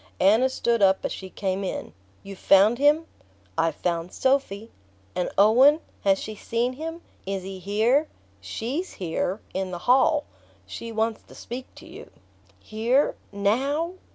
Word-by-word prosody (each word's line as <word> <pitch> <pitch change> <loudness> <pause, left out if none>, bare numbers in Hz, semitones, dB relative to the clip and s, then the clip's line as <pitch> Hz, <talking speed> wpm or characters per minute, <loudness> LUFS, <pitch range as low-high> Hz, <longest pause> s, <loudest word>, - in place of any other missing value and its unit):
Anna 220 +7 +4
stood 235 -3 0
up 190 -1 +3
as - - -2
she 190 - -7
came 190 0 -2
in. 190 - -5 0.3
"You've 195 -1 -10
found 205 +5 +5
him?" 295 +3 +4 0.5
"I've 165 - +1
found 170 0 -2
Sophy." 235 -5 0 0.4
"And 180 - -1
Owen? 255 +9 +6 0.2
has 195 -1 +4
she 215 - -6
seen 235 +4 -2
him? 325 +5 -6 0.3
Is 195 -1 -3
he 190 0 -7
here?" 225 - +2 0.3
"SHE'S 245 - -4
here: 185 +3 -3
in 190 0 -2
the 180 - -5
hall. 270 +4 +4 0.4
She 230 - -7
wants 225 0 -1
to - - -17
speak 250 +2 -7
to - - -13
you." - - -11 0.5
"Here 235 +6 +1 0.2
NOW?" 270 - 0
220 Hz, 150 wpm, -25 LUFS, 195-260 Hz, 0.5 s, Owen